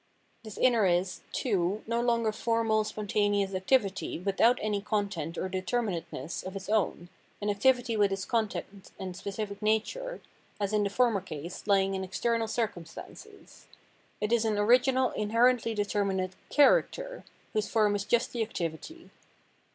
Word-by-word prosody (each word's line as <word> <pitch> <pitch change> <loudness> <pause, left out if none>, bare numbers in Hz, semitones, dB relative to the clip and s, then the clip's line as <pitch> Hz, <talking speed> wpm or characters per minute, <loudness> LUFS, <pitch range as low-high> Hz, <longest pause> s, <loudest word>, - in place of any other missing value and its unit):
This 215 -2 -9
inner 235 -6 +4
is, 180 +1 0
too, 200 -3 0
no 235 +1 0
longer 235 -2 +2
formal, 225 0 +1
spontaneous 205 -2 0
activity 195 +1 +1
without 200 +7 +3
any 210 -1 -1
content 200 -6 -2
or - - -1
determinateness 185 - -3
of 190 +1 -7
its 195 0 -6
own, 195 -5 0 0.3
an 205 0 0
activity 245 +3 +2
with 205 -2 +3
its 195 0 -2
content 205 -4 -3
and 185 -2 -6
specific 200 +2 -5
nature, 225 - -1 0.4
as 200 0 -1
in 210 -1 +3
the 200 - 0
former 225 -2 +2
case, 170 +2 -8
lying 195 -1 +3
in 190 0 -2
external 230 +4 -1
circumstances; 220 - -6 0.5
it 210 +2 0
is 235 -1 +3
an 220 -2 +1
origiaal 250 +5 +3
inherently 230 +2 +2
determinate 200 -3 0 0.2
Character, - - +3 0.3
whose 215 -1 0
form 210 -2 +3
is 200 - -1
just 235 +4 +1
the 235 - -2
activity. 215 - -5
210 Hz, 145 wpm, -29 LUFS, 195-230 Hz, 0.5 s, inner